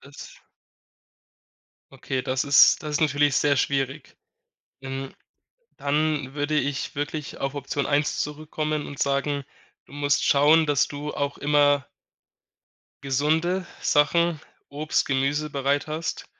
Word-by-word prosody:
Das 140 Hz, 0 st, -13 dB, 1.5 s
Okay, 130 Hz, -1 st, -4 dB
das 130 Hz, 0 st, -1 dB
ist 140 Hz, +2 st, +6 dB
das 150 Hz, -, -4 dB
ist 160 Hz, -, 0 dB
natürlich 145 Hz, -2 st, +2 dB
sehr 145 Hz, -1 st, +3 dB
schwierig. 135 Hz, +1 st, -2 dB, 0.6 s
Ähm, 135 Hz, 0 st, -6 dB, 0.6 s
dann 145 Hz, -1 st, -1 dB
würde 150 Hz, +1 st, 0 dB
ich 140 Hz, +1 st, -3 dB
wirklich 145 Hz, +1 st, -4 dB
auf 135 Hz, 0 st, -3 dB
Option 145 Hz, 0 st, -3 dB
1 145 Hz, +1 st, 0 dB
zurückkommen 150 Hz, 0 st, -3 dB
und 140 Hz, -, -9 dB
sagen: 140 Hz, 0 st, 0 dB, 0.4 s
„Du -, -, -18 dB
musst 145 Hz, 0 st, +1 dB
schauen, 150 Hz, +3 st, +5 dB
dass 145 Hz, -3 st, +2 dB
du 145 Hz, +1 st, -6 dB
auch 140 Hz, 0 st, -3 dB
immer“ 145 Hz, -1 st, +2 dB, 1.2 s
gesunde 160 Hz, +7 st, 0 dB, 0.2 s
Sachen, 160 Hz, +2 st, +2 dB, 0.3 s
Obst, 150 Hz, +2 st, -1 dB
Gemüse 145 Hz, +2 st, -1 dB
bereit 140 Hz, +1 st, 0 dB
hast 155 Hz, +1 st, -4 dB
145 Hz, 120 wpm, -24 LUFS, 140-150 Hz, 1.5 s, ist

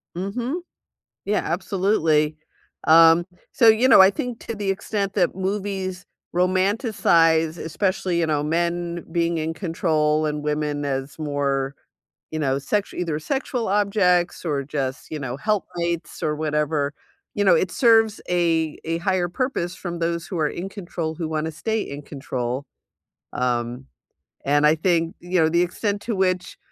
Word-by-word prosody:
Mhm. 240 Hz, -, -3 dB, 0.6 s
Yeah, 210 Hz, +1 st, +1 dB
absolutely. 165 Hz, -4 st, +1 dB, 0.5 s
Um, 165 Hz, +1 st, +7 dB, 0.3 s
so, 230 Hz, -, +4 dB
you 220 Hz, +4 st, +5 dB
know, 260 Hz, -, +8 dB
I 190 Hz, -, +8 dB
think 235 Hz, +4 st, -4 dB
to 230 Hz, -, -5 dB
the 205 Hz, -2 st, -3 dB
extent 200 Hz, 0 st, -2 dB
that 180 Hz, -4 st, +1 dB
movies 190 Hz, -1 st, -3 dB, 0.3 s
romanticize, 180 Hz, -, +2 dB
especially, 180 Hz, +1 st, -1 dB
you 165 Hz, -, +1 dB
know, 150 Hz, -2 st, 0 dB
men 170 Hz, +2 st, -1 dB
being 170 Hz, 0 st, +1 dB
in 160 Hz, +1 st, -2 dB
control, 155 Hz, -3 st, 0 dB
and 150 Hz, -1 st, -2 dB
women 150 Hz, -1 st, -1 dB
as 135 Hz, 0 st, -3 dB
more, 140 Hz, -2 st, -1 dB, 0.6 s
you 155 Hz, -, -3 dB
know, 135 Hz, -3 st, +1 dB
sexu 195 Hz, +9 st, -1 dB
either 165 Hz, -4 st, -2 dB
sexual 255 Hz, -, -2 dB
objects, 195 Hz, -3 st, +2 dB
or 145 Hz, -4 st, -1 dB
just, 135 Hz, -1 st, -4 dB
you 155 Hz, -, -3 dB
know, 130 Hz, -2 st, -4 dB
helpmates, 170 Hz, -5 st, -2 dB
or 150 Hz, -, 0 dB
whatever, 150 Hz, -1 st, -1 dB, 0.4 s
you 205 Hz, -, +1 dB
know, 195 Hz, -, +6 dB
it 185 Hz, -, +1 dB
serves 225 Hz, -1 st, +4 dB
a 165 Hz, -3 st, +1 dB
a 165 Hz, +1 st, -1 dB
higher 185 Hz, -1 st, +1 dB
purpose 180 Hz, -4 st, -2 dB
from 175 Hz, -2 st, -6 dB
those 170 Hz, 0 st, -1 dB
who 180 Hz, -, -4 dB
are 155 Hz, -, +2 dB
in 185 Hz, +3 st, -5 dB
control 170 Hz, -5 st, -5 dB
who 165 Hz, 0 st, -3 dB
wanna 160 Hz, 0 st, -2 dB
stay 220 Hz, +8 st, -2 dB
in 140 Hz, -5 st, -6 dB
control, 130 Hz, -2 st, -4 dB, 0.7 s
um, 125 Hz, 0 st, -1 dB, 0.6 s
and 145 Hz, +1 st, +3 dB
I 155 Hz, -, +4 dB
think, 165 Hz, 0 st, +1 dB
you 175 Hz, +1 st, -1 dB
know, 160 Hz, -1 st, +4 dB
the 170 Hz, +2 st, +3 dB
extent 200 Hz, +3 st, -2 dB
to 230 Hz, -2 st, -2 dB
which 185 Hz, -1 st, 0 dB
170 Hz, 155 wpm, -23 LUFS, 150-190 Hz, 0.7 s, know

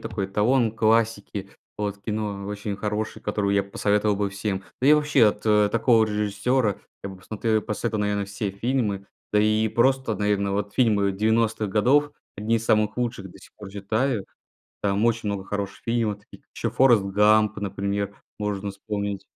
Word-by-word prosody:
такой 100 Hz, -2 st, -3 dB
эталон 110 Hz, +4 st, +2 dB
классики, 110 Hz, -3 st, 0 dB, 0.3 s
вот 105 Hz, -1 st, -3 dB
кино 105 Hz, -1 st, -4 dB
очень 105 Hz, 0 st, -4 dB
хороший, 105 Hz, +1 st, -3 dB
которую 100 Hz, -1 st, 0 dB
я 100 Hz, -, +3 dB
б 100 Hz, -, -15 dB
посоветовал 105 Hz, 0 st, +1 dB
всем. 95 Hz, 0 st, -3 dB, 0.2 s
Да 130 Hz, -, +3 dB
и -, -, +8 dB
вообще 150 Hz, -5 st, +4 dB
от 105 Hz, 0 st, 0 dB, 0.3 s
такого 115 Hz, 0 st, +4 dB
режиссера 105 Hz, +2 st, 0 dB, 0.3 s
я 100 Hz, -, -4 dB
бы 95 Hz, -, -10 dB
посмотре 110 Hz, +2 st, -1 dB
посоветовал, 110 Hz, +1 st, -3 dB
наверное, 105 Hz, 0 st, 0 dB
все 100 Hz, +1 st, -4 dB
фильмы. 100 Hz, -2 st, -1 dB, 0.3 s
Да 105 Hz, -, +4 dB
и 110 Hz, +1 st, +2 dB
просто, 130 Hz, 0 st, +1 dB
наверное, 100 Hz, -1 st, 0 dB
вот 100 Hz, 0 st, -2 dB
фильмы 105 Hz, -5 st, +2 dB
90-х 110 Hz, +1 st, +1 dB
годов- 130 Hz, +9 st, +3 dB, 0.3 s
одни 110 Hz, +3 st, +1 dB
из 115 Hz, -, -4 dB
самых 110 Hz, -2 st, +2 dB
лучших, 120 Hz, -6 st, -3 dB
до -, -, -15 dB
сих -, -, -17 dB
пор 105 Hz, -2 st, -10 dB
читаю. 110 Hz, +3 st, -1 dB, 0.6 s
Там 100 Hz, +2 st, +1 dB
очень 115 Hz, -2 st, +1 dB
много 100 Hz, -1 st, -3 dB
хороших 100 Hz, 0 st, -5 dB
фильмов, 115 Hz, -3 st, 0 dB
таких -, -, -17 dB
как -, -, -45 dB
ещё -, -, -2 dB
"Форрест 120 Hz, -6 st, +5 dB
Гамп", 105 Hz, +2 st, +3 dB
например, 100 Hz, 0 st, -3 dB, 0.2 s
можно 105 Hz, -1 st, -2 dB
вспомнить. 100 Hz, -1 st, -4 dB
105 Hz, 165 wpm, -24 LUFS, 100-110 Hz, 0.6 s, и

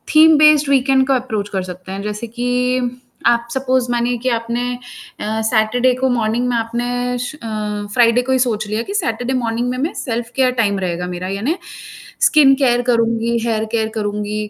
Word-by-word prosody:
theme 315 Hz, 0 st, +7 dB
based 300 Hz, -1 st, +5 dB
weekend 265 Hz, -1 st, +3 dB
को 270 Hz, -, +3 dB
approach 220 Hz, -5 st, -2 dB
कर 190 Hz, -2 st, -2 dB
सकते 185 Hz, +1 st, -9 dB
हैं, 195 Hz, +1 st, -4 dB
जैसे 210 Hz, +3 st, -5 dB
कि 245 Hz, +1 st, -1 dB, 0.3 s
आप 235 Hz, 0 st, +2 dB
सपोज 260 Hz, -2 st, 0 dB
मानिए 240 Hz, 0 st, 0 dB
कि 255 Hz, +2 st, -2 dB
आपने 240 Hz, +2 st, -3 dB, 0.5 s
अ, 220 Hz, +1 st, -2 dB
सैटरडे 245 Hz, +3 st, +2 dB
को 260 Hz, +1 st, 0 dB
मॉर्निंग 235 Hz, +1 st, 0 dB
में 245 Hz, -, 0 dB
आपने 245 Hz, +2 st, -2 dB
श 245 Hz, +5 st, -5 dB
अ, 235 Hz, -6 st, -9 dB, 0.5 s
फ्राइडे 240 Hz, 0 st, +4 dB
को 255 Hz, +1 st, -3 dB
ही 260 Hz, -, +3 dB
सोच 220 Hz, -4 st, 0 dB
लिया 215 Hz, +2 st, -2 dB
कि 400 Hz, -, -6 dB
सैटरडे 245 Hz, -, -1 dB
मॉर्निंग 240 Hz, -1 st, -1 dB
में 255 Hz, -, -3 dB
मैं 295 Hz, +6 st, -2 dB
सेल्फ 235 Hz, -2 st, -4 dB
केयर 260 Hz, -1 st, +3 dB
टाइम 200 Hz, -2 st, 0 dB
रहेगा 180 Hz, -1 st, -3 dB
मेरा, 180 Hz, +1 st, -5 dB
यानी 225 Hz, -, -2 dB, 0.6 s
स्किन 290 Hz, -4 st, +6 dB
केयर 245 Hz, -3 st, +2 dB
करूँगी, 230 Hz, 0 st, +1 dB
हेयर 220 Hz, -2 st, 0 dB
केयर 225 Hz, -1 st, 0 dB
करूँगी 210 Hz, 0 st, -3 dB
240 Hz, 185 wpm, -18 LUFS, 220-255 Hz, 0.6 s, theme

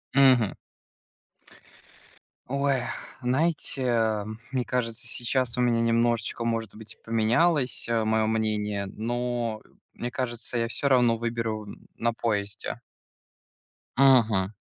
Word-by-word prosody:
Мгм. 130 Hz, -6 st, +5 dB, 1.9 s
Ой, 140 Hz, -1 st, +1 dB, 0.4 s
знаете, 125 Hz, -6 st, +1 dB, 0.3 s
мне 130 Hz, -2 st, -1 dB
кажется, 120 Hz, -1 st, -2 dB
сейчас 120 Hz, +1 st, -1 dB
у -, -, +2 dB
меня 120 Hz, -1 st, +3 dB
немножечко, 115 Hz, -1 st, +1 dB
может 115 Hz, -2 st, -2 dB
быть, 110 Hz, +1 st, -9 dB
поменялось, 125 Hz, +6 st, +2 dB
э, 115 Hz, -1 st, +1 dB
моё 110 Hz, 0 st, +2 dB
мнение, 105 Hz, -2 st, -1 dB
но 120 Hz, +1 st, -2 dB, 0.3 s
мне 120 Hz, -, -5 dB
кажется, 120 Hz, -1 st, -3 dB
я 115 Hz, 0 st, +1 dB
всё 140 Hz, +4 st, -1 dB
равно 120 Hz, -3 st, +4 dB
выберу 115 Hz, -2 st, -3 dB, 0.3 s
на 120 Hz, 0 st, 0 dB
поезде. 105 Hz, -3 st, -2 dB, 1.2 s
Мгм. 115 Hz, -8 st, +5 dB
115 Hz, 100 wpm, -27 LUFS, 110-125 Hz, 1.9 s, Мгм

